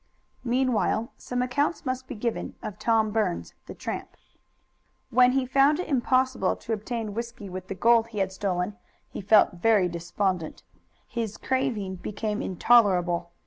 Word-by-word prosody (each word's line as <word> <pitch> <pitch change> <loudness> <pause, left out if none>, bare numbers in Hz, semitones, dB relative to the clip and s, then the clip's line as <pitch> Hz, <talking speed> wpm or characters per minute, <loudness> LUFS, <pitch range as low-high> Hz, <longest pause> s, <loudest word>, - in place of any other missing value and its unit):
Meanwhile 245 -2 0
some 250 0 -2
account 285 +6 -1
must 260 0 -3
be 260 - -6
given 230 +1 -3
of 210 0 -6
Tom 220 -1 +2
Burns, 85 - -1
the - - -8
tramp. - - -6 0.9
When 250 +1 +5
he 265 -1 +1
found 275 +4 +3
it 365 - -3
impossible 260 -1 +1
to 230 - -5
obtain 220 0 -4
whisky 235 -2 -6
with 185 0 -7
the 195 - -5
gold 230 +3 +4
he 225 -2 -10
had 195 -1 0
stolen 190 +1 -2 0.3
he - - -6
felt 200 -2 +4
very 210 -4 +4
despondent. 175 0 -3 0.4
His 225 -3 -4
craving 235 -8 -1
became 210 +3 -3
intolerable. 180 -4 +3
220 Hz, 145 wpm, -26 LUFS, 195-250 Hz, 0.9 s, When